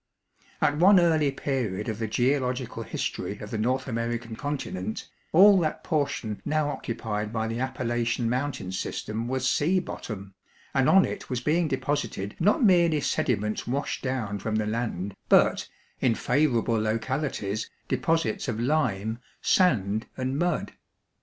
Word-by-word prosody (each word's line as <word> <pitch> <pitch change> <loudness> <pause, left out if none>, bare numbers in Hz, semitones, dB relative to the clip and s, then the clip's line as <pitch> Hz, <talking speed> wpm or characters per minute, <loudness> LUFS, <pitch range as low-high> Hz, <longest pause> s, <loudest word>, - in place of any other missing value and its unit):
At 145 - +2
one 190 +4 +7
early 160 -4 +3
period 125 -8 -2
of 110 -1 -3
the 110 - -1
geological 125 +2 0
history - - -3
of - - -9
the - - -2
North 130 +4 0
American 115 -1 -3
continent, 110 -8 -4 0.2
all 195 +3 +7
that 155 -3 -2
portion 140 -8 -1
now 150 0 0
occupied 110 -5 -3
by 110 -1 -1
the 115 +1 -3
Appalachian 120 -2 -1
mountain 125 -5 -2
system 110 +4 -3
was 130 0 -1
sea 170 +8 +2
bottom, 100 - -7 0.4
and 135 -1 +3
on 190 0 +6
it 200 - -6
was 125 - -1
being 160 +5 +1
deposited 130 -7 -2
not 205 +8 +3
merely 170 -6 +5
sediments 105 -6 -1
washed 135 +4 -2
down 120 -6 -2
from 110 +2 -2
the 110 0 +1
land, 105 -4 -2 0.2
but, - - +4 0.3
in 120 -3 +2
favorable 120 -7 +1
localities, 110 -1 -2 0.2
deposits 165 +3 0
of 115 -3 -2
lime, 115 -5 0 0.2
sand, 110 - +2
and 130 +2 -2
mud. 175 -1 0
125 Hz, 140 wpm, -27 LUFS, 110-150 Hz, 0.4 s, one